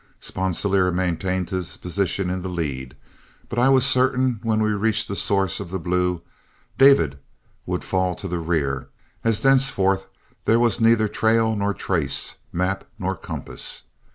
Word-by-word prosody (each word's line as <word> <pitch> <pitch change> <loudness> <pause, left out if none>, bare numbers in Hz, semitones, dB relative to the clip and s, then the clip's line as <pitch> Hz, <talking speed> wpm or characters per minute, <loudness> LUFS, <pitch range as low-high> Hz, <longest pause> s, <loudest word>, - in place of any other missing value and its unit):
Sponsilier 95 0 0
maintained 90 0 -1
his 90 -2 -4
position 90 0 -1
in 95 0 -3
the 95 - -5
lead, 70 -7 -4 0.5
but 120 - -2
I 130 +2 +4
was 135 -1 +5
certain 130 -2 +2
when 110 -2 0
we 110 - +1
reached 105 +1 0
the 100 - -4
source 95 -2 +1
of - - -6
the 95 - -3
Blue, 90 0 -1 0.6
David 85 - +5 0.5
would - - -2
fall 95 -1 0
to 95 - -6
the 90 -1 -2
rear, 75 -6 -1 0.4
as 115 -2 +1
thenceforth 100 -8 +3 0.4
there 115 +1 +4
was 120 0 +1
neither 115 -1 +4
trail 110 +1 +2
nor 100 -1 -1
trace, 85 -6 -1
map 90 +2 -1
nor 95 -2 -2
compass. - - -3
95 Hz, 155 wpm, -23 LUFS, 90-115 Hz, 0.6 s, was